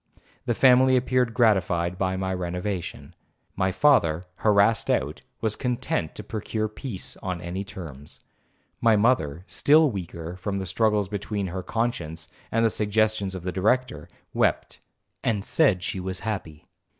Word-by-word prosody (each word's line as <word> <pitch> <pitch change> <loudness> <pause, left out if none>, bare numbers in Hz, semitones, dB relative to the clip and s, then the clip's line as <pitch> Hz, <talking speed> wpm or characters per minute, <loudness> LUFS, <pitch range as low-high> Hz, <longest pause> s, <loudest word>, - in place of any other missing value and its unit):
The 120 - +1
family 130 +1 +6
appeared 125 -1 +1
gratified 95 -6 +2
by 95 -1 0
my 95 0 -2
renovation. 90 +1 -4 0.4
My 95 -1 +1
father, 90 - +3
harassed 105 +1 +3
out, - - 0 0.2
was 110 -2 0
content 125 -10 -2
to 105 - -7
procure 110 +1 -3
peace 110 -2 -6
on 90 -2 -4
any 90 +3 -4
terms. 80 -8 -7 0.6
My 115 -2 +5
mother, 95 - +1
still 150 +6 +4
weaker, 85 -3 -6
from 100 +2 -3
the 95 - -3
struggles 105 +2 +1
between 100 0 -3
her 95 +1 -4
conscience 85 -8 -3 0.2
and 115 0 +2
the 110 - +3
suggestions 105 -2 0
of 90 - -6
the 90 - -2
Director, 105 - 0 0.2
wept, - - 0 0.4
and 105 -3 0
said 105 - +3
she 95 - -3
was 95 0 -4
happy. 90 -9 -5
100 Hz, 145 wpm, -25 LUFS, 90-115 Hz, 0.6 s, family